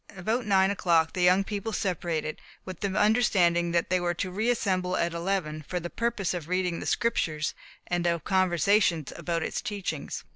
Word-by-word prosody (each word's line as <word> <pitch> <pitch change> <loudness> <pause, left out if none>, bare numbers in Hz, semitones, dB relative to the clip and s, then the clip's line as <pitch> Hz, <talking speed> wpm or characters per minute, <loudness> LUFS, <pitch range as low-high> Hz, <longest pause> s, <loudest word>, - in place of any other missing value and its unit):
About 220 +6 -1
nine 190 -1 +4
o'clock 170 -5 +2
the 180 - -2
young 180 +2 +5
people 205 +2 -4
separated, 170 -6 -2 0.2
with 185 -3 -7
the 200 - -1
understanding 185 -7 +3
that 170 +1 0
they 185 - +3
were 175 0 -1
to 185 +2 -3
re 215 +6 0
assemble 185 -6 0
at 170 0 0
eleven, 170 -3 -2
for 180 - -2
the 175 0 -6
purpose 230 -6 -1
of 170 -4 -5
reading 180 -1 0
the - - -5
Scriptures, 155 -9 0 0.3
and 175 -1 -1
of 170 -3 0
conversation 185 -2 +2
about 170 -2 -2
its - - -3
teachings. 185 -8 -4
180 Hz, 180 wpm, -27 LUFS, 170-200 Hz, 0.3 s, young